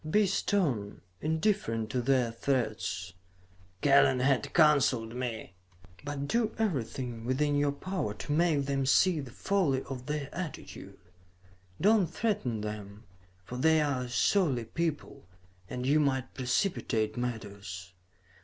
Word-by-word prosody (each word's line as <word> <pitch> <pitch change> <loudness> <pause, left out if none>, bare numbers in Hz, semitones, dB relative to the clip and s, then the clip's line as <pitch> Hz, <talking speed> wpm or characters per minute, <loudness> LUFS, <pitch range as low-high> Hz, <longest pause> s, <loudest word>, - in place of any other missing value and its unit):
"Be 210 +5 +4
stern, 155 - 0 0.2
indifferent 160 - 0
to 125 - 0
their 125 -2 +2
threats," 110 -7 -2 0.7
Kellen, 140 -2 +5
had 130 0 +1
counseled 135 -8 +3
me, 120 -5 -4 0.5
"but 140 -1 -4
do 230 +2 0
everything 125 - -2
within 145 +4 +1
your 145 0 +2
power 145 - -3
to 105 +7 -6
make 155 -2 +2
them 135 -1 -1
see 175 +4 +4
the 135 -3 -6
folly 140 - 0
of 130 -2 -7
their 150 -2 -2
attitude. 175 -5 -7 0.8
Do 215 +2 +5
not 180 -5 0
threaten 170 - -1
them, 105 0 -6 0.4
for 125 - -6
they 160 +4 +4
are 140 -4 0
a - - -8
surly 130 - +2
people 160 - -3 0.4
and 125 0 -4
you 145 +3 +4
might 135 -3 0
precipitate 125 - 0
matters. 100 -6 -5
135 Hz, 130 wpm, -30 LUFS, 115-155 Hz, 0.8 s, Kellen